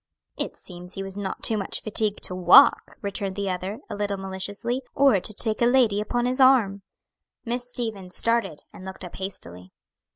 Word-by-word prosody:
"It - - -4
seems 180 0 -11
he 195 - -4
was 195 0 -6
not 200 -2 -5
too 220 -2 +2
much 195 - -3
fatigued 215 -1 0
to - - -1
walk," 185 +10 +5
returned 200 -1 -3
the 200 -1 -2
other, 185 +3 -4
a - - -7
little 205 -1 -2
maliciously; 195 +6 -4
"or 270 -8 +4
to 195 - -3
take 215 +1 +2
a 235 - +5
lady 240 -5 +3
upon 240 +3 -1
his 255 +2 -1
arm." 230 -7 +4 0.6
Miss 245 +1 -3
Stevens 215 -7 -4
started, 230 -10 0
and - - -12
looked 190 0 -8
up 175 - -10
hastily. 90 - -7
200 Hz, 185 wpm, -24 LUFS, 190-235 Hz, 0.6 s, walk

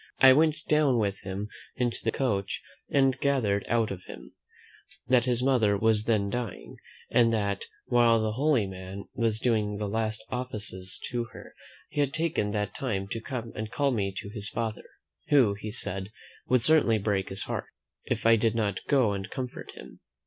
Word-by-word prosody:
I 130 0 +9
went 155 +2 +4
down 150 -4 +3
with 100 -3 0
him 95 +2 -5 0.3
into 125 -2 -1
the 115 - +1
coach, 100 -8 -1 0.3
and 135 -2 +3
gathered 115 -8 +1
out 115 -1 +1
of 95 -2 -5
him, - - -11 0.7
"That 125 -1 +4
his 125 -1 +1
mother 115 -7 +3
was 110 0 +2
then 100 -3 +1
dying; 120 -1 -5 0.3
and 115 -2 +5
that, 100 -2 -1 0.2
while 120 -2 +4
the 110 0 0
holy 130 -1 +2
man 95 +1 -7
was 115 -3 0
doing 110 -4 +1
the 105 0 -2
last 110 +1 -1
offices 105 -7 -4
to 120 -1 -1
her, - - -11 0.4
he - - -4
had 140 -2 +1
taken 160 -10 0
that 105 0 -2
time 100 -7 -3
to 115 - -4
come 120 -2 -5
and 110 0 -4
call 140 -1 +1
me 100 -5 0
to 100 - -5
his 105 -2 -5
father, 110 -2 -3 0.4
who, 130 -8 +5
he 105 +1 -6
said, 95 -3 -2 0.4
would 125 -2 +3
certainly 145 -6 +5
break 100 -2 -1
his 95 +1 -2
heart, - - -3 0.4
if - - -2
I 115 0 +7
did 115 0 +1
not 105 -4 -1
go 130 -8 +3
and 95 -1 -4
comfort 125 -1 -6
him." - - -12
110 Hz, 180 wpm, -28 LUFS, 100-125 Hz, 0.7 s, I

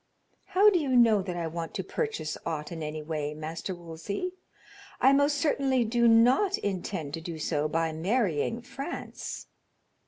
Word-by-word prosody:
"How 410 +3 +5
do 360 - +3
you 275 -5 0
know 225 -4 +6
that 180 -2 -4
I 170 - -2
want 165 0 -5
to - - -2
purchase 440 - -3
aught 155 -1 -4
in 165 -1 -5
any 155 0 -4
way, 150 -1 -3
Master 160 +4 -5
Wolsey? 175 - -5 0.7
I 270 - +6
most 285 +1 +3
certainly 275 -5 +2
do 235 +1 +3
not 250 - +5
intend 185 -6 -3
to 165 - -4
do 165 0 -6
so 150 -1 0
by 165 +1 0
marrying 195 - 0
France." 275 +6 -6
185 Hz, 160 wpm, -28 LUFS, 160-260 Hz, 0.7 s, know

